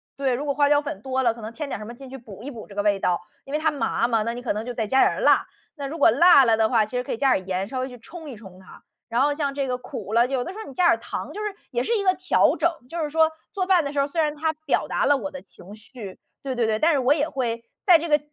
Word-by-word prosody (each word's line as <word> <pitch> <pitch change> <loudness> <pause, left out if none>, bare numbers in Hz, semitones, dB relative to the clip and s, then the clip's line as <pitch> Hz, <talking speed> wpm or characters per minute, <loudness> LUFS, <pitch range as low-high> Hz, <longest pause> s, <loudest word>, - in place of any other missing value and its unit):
对， 270 -2 0
如 270 +4 -3
果 285 - 0
花 290 0 +3
椒 290 0 +4
粉 240 -9 -6
多 265 +2 -1
了， 235 -3 +2
可 230 - -12
能 215 +1 -6
添 300 +2 -5
点 - - -3
儿 - - -12
什 - - -7
么 235 - -8
进 265 +2 -12
去 270 - -8
补 215 -5 -12
一 280 - -5
补 235 -6 -9
这 205 - -14
个 205 - 0
味 205 -1 +1
道。 175 -2 +1 0.2
因 275 - -10
为 300 - +1
它 315 0 +2
麻 235 -4 0
嘛， 225 -3 +1
那 230 - -2
你 245 - -7
可 245 - -2
能 215 +2 -4
就 245 - -4
再 225 -2 -2
加 265 +4 +3
点 - - +5
儿 - - -3
辣， - - +4 0.3
那 285 -3 -6
如 320 +4 -6
果 - - +6
辣 280 +2 +7
了 225 -2 +3
的 220 -1 +2
话 225 -4 +3
其 210 - -17
实 250 - -1
可 - - -6
以 - - -4
加 270 +1 +3
点 190 - -2
儿 - - -19
盐 190 +1 -2
稍 255 +3 -4
微 260 - -3
去 245 -1 -12
冲 325 +6 -11
一 260 - -8
冲 195 -4 -13
它。 190 - -16 0.3
然 235 +2 +1
后 290 +1 +3
像 285 -2 -2
这 275 -1 -2
个 250 -1 -1
苦 220 -4 -7
了， 235 +1 +5
有 260 -1 -1
的 360 - -6
时 - - -11
候 - - -12
你 - - -10
加 360 - +2
点 340 - +7
儿 - - +2
糖 - - -6
就 425 - -5
是 420 -1 -3 0.2
也 - - 0
是 465 - 0
一 405 - -1
个 370 -1 +4
调 370 +1 +2
整。 340 - +2 0.2
就 335 - -5
是 300 - -2
说， 320 +1 +3 0.2
做 375 -3 -2
饭 365 -3 +4
的 280 - -4
时 285 - 0
候 280 - +2
虽 325 +3 -1
然 300 -1 0
它 315 +1 0
表 285 - +1
达 - - 0
了 285 0 +4
我 200 -7 -4
的 185 - -8
情 190 +1 -14
绪 215 -3 -10 0.2
对 265 -2 -4
对 240 -2 +1
对， 220 -1 0
但 325 +5 +4
是 285 - +2
我 260 +2 +4
也 295 0 0
会 235 -4 -3 0.2
在 360 -4 +8
这 335 - -4
个 295 0 +4
265 Hz, 375 characters per minute, -24 LUFS, 225-295 Hz, 0.3 s, 在